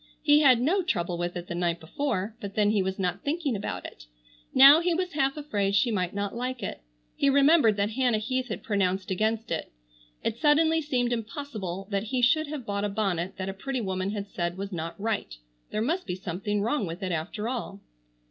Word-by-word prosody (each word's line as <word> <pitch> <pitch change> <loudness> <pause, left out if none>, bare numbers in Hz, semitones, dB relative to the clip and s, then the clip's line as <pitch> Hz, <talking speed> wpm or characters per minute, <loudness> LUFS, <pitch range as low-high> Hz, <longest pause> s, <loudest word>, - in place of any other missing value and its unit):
He 295 -1 +6
had 260 -5 +6
no 335 +11 +2
trouble 175 - -1
with 175 +1 -2
it 175 - -6
the 175 - -5
night 170 -1 -1
before, 215 - -2
but 200 -1 -6
then 210 -1 +3
he 210 -2 +2
was 190 0 -2
not 180 0 -1
thinking 290 -4 -1
about 200 - -4
it. - - -10 0.4
Now 275 +4 +9
he 345 0 +1
was 365 +1 -1
half 275 -1 +1
afraid 205 -10 -1
she 235 +4 +3
might 185 -4 0
not 200 0 -2
like 250 -1 -3
it. 190 - -5 0.3
He 280 - +2
remembered 280 -5 +5
that 205 +1 0
Hannah 245 -1 +2
Heath 255 +4 -2
had 215 - -5
pronounced 190 -3 0
against 220 +3 0
it. 165 - -3 0.5
It 230 +1 -2
suddenly 320 +2 +4
seemed 245 -5 0
impossible 215 - -5
that 200 +1 0
he 250 +2 -1
should 310 +6 +4
have 290 -4 -6
bought 200 -1 -2
a 205 - 0
bonnet 195 -4 -2
that 190 0 -4
a 195 - -3
pretty 260 +7 -3
woman 190 -3 -2
had 205 -1 -4
said 175 -2 -3
was 200 +1 -5
not 165 +1 -5
right. 210 - -2 0.3
There 215 - -1
must 335 +9 -1
be 180 - -2
something 195 +3 -2
wrong 230 -3 0
with 170 +4 -6
it 185 - -2
after 180 +7 -3
all. 235 -5 -4
215 Hz, 215 wpm, -27 LUFS, 190-265 Hz, 0.5 s, Now